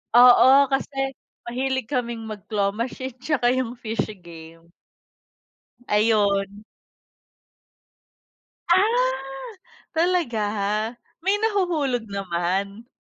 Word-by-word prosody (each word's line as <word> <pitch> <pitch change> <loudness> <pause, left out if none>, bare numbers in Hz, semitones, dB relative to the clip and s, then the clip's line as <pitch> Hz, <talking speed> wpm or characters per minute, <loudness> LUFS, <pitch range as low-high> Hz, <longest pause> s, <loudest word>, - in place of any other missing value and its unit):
oo, 260 +3 +7
kasi 270 -1 -1 0.3
mahilig 260 0 -2
kaming 235 -3 -2
mag-claw 205 -1 -2
machine 255 +2 -4
tsaka 255 -6 +2
yung 250 -2 -2
fishy 220 -2 -3
game. 165 -1 -13 1.2
Ayun. 205 -1 +1 2.1
Ah, 470 +7 +4 0.9
talaga? 335 -10 +1 0.8
May 390 +2 +3
nahuhulog 340 - 0
naman? 195 +3 -2
240 Hz, 75 wpm, -23 LUFS, 200-270 Hz, 2.1 s, oo